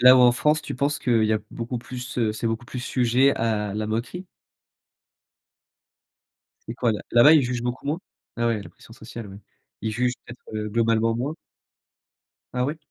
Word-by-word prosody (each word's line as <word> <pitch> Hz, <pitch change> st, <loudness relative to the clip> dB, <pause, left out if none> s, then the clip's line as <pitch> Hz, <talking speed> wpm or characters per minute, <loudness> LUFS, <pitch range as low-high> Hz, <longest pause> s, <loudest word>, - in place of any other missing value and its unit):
Là 125 Hz, +1 st, +9 dB
où -, -, +6 dB
en 120 Hz, -1 st, +7 dB
France, 150 Hz, +4 st, +2 dB
tu -, -, -5 dB
penses 140 Hz, +3 st, 0 dB
qu'il 115 Hz, -4 st, +2 dB
y 110 Hz, -, +2 dB
a 110 Hz, -, +2 dB
beaucoup 120 Hz, +1 st, -4 dB
plus, 125 Hz, +1 st, -7 dB
heu, 110 Hz, -2 st, +2 dB
c'est 115 Hz, +2 st, -3 dB
beaucoup 115 Hz, +1 st, -2 dB
plus 125 Hz, +1 st, -6 dB
sujet 125 Hz, +2 st, +3 dB
à 105 Hz, -3 st, -1 dB
la 105 Hz, 0 st, -2 dB
moquerie? 120 Hz, -, -3 dB, 2.4 s
C'est 115 Hz, -, -4 dB
quoi 120 Hz, -2 st, +1 dB
là? 105 Hz, -, -4 dB
Là-bas, 120 Hz, +6 st, +8 dB
ils 155 Hz, -4 st, +6 dB
jugent 120 Hz, -1 st, -2 dB
beaucoup 125 Hz, +3 st, -4 dB
moins? 155 Hz, +4 st, 0 dB, 0.4 s
Ah 120 Hz, 0 st, +1 dB
ouais, 110 Hz, -3 st, -1 dB
la -, -, -12 dB
pression -, -, -17 dB
sociale, 115 Hz, -3 st, -9 dB
ouais. 100 Hz, +1 st, -10 dB, 0.4 s
Ils 110 Hz, -, -1 dB
jugent 125 Hz, +1 st, +1 dB
peut-être, 120 Hz, -, -11 dB
heu, 105 Hz, 0 st, -2 dB
globalement 115 Hz, 0 st, +2 dB
moins? 135 Hz, +7 st, -2 dB, 1.2 s
Ah 125 Hz, -, +2 dB
ouais? 145 Hz, +4 st, -2 dB
120 Hz, 190 wpm, -24 LUFS, 115-125 Hz, 2.4 s, Là